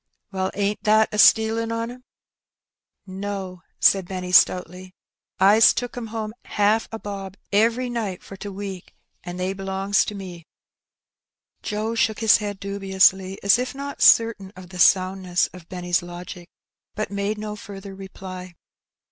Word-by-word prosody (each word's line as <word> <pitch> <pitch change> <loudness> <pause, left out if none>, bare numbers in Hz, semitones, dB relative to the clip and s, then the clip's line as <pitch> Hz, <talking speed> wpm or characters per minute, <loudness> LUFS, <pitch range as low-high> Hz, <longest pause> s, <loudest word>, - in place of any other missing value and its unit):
" - - -56
Well, 190 -1 -1
ain't 205 +1 -1
that 215 +1 +4
a 210 - -2
stealin' 225 +1 +4
on 230 +1 -3
'em? 250 +1 -13 0.4
" - - -69
" - - -61
No! 190 -1 -6
" - - -48
said 190 -3 +4
Benny 180 -1 -5
stoutly. 185 0 +2 0.2
'* - - -58
I's 220 +1 +6
tooked 245 0 -4
'em 240 -2 -5
home 215 -1 -5
haaf 210 +2 +1
a 225 - -4
bob 195 -2 -7
every 230 +5 +2
night 220 -6 -4
for 195 - -10
t' 205 +1 -7
week, 195 -2 -8 0.3
and 180 0 -7
they 185 +1 -1
b'longs 195 +1 0
to 210 - -5
me." 180 -4 -9 1.1
Joe 215 +1 -3
shook 220 -1 +1
his 220 -2 +6
head 205 -2 -5
dubiously 190 -1 +1
as 200 +4 +5
if 255 +2 -3
not 280 +1 -7
certain 225 -4 +4
of 185 -1 -12
the 185 -1 -9
sound 185 +1 +4
ness 180 -1 +1
of 180 -2 -13
Benny's 180 0 -1
logic, 175 0 -9 0.5
but 215 -1 -3
made 200 +1 -2
no 210 0 -5
further 200 -1 -10
reply. 185 -2 -9
195 Hz, 170 wpm, -23 LUFS, 185-215 Hz, 1.1 s, I's